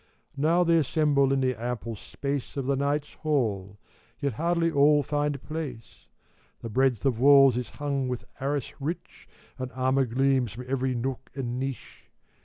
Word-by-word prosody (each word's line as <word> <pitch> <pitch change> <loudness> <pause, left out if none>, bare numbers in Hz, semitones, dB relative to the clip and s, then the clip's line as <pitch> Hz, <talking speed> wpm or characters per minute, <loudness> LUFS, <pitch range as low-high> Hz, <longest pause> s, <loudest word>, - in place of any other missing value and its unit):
Now 160 +5 +3
they 170 -1 +4
assemble 145 -2 +2
in 135 0 +2
the 130 -1 +2
ample 120 -1 -3
space 140 +6 -5
Of 135 - -2
the 140 +1 +1
Knights' 145 +2 -1
Hall; 105 -10 -1 0.4
yet 140 -3 -1
hardly 170 +5 +1
all 145 0 +4
find 145 0 -1
place. 145 -8 -7 0.6
The 115 - -5
breadth 130 0 +1
of 125 -4 +1
walls 135 -1 +7
is 125 -2 -3
hung 140 -3 -2
with 125 -1 -4
arras 140 0 -2
rich, 160 +6 -6 0.3
And 130 0 -4
armor 130 +1 +2
gleams 130 -1 +1
from 125 +3 -8
every 130 -1 0
nook 130 +2 -4
and 125 -2 -3
niche. 135 -1 -6
135 Hz, 160 wpm, -27 LUFS, 125-145 Hz, 0.6 s, walls